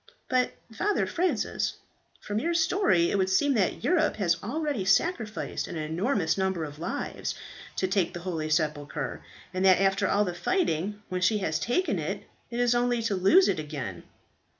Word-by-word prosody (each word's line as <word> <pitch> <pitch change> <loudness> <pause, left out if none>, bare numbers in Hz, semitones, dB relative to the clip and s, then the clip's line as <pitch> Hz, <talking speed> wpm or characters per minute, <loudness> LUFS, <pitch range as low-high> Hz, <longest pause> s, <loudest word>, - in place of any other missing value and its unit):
"But, 255 -1 +2 0.2
Father 415 - +1
Francis, 360 +1 -1 0.5
from 210 0 -2
your 335 +7 -1
story 320 - +3
it 200 - +1
would 190 0 +2
seem 275 +10 +3
that 205 -7 0
Europe 350 -2 +2
has 180 -5 +2
already 285 -1 -2
sacrificed 220 - 0
an - - -6
enormous 165 - 0
number 190 -3 0
of 150 -1 -7
lives 165 - -3 0.4
to 190 - 0
take 185 -2 +1
the 175 - -7
holy 165 -4 -3
sepulchre, 150 -3 -1 0.3
and 185 +1 -1
that 190 -1 +6
after 195 0 +2
all 205 +1 +2
the 180 - -3
fighting, 205 - -1
when 185 0 -2
she 210 +4 +3
has 160 -6 -1
taken 245 - 0
it, - - -3 0.3
it 235 - -4
is 245 -1 +3
only 240 -1 +1
to 215 -3 0
lose 255 - +5
it - - +1
again." 140 - -5
195 Hz, 175 wpm, -28 LUFS, 170-245 Hz, 0.5 s, that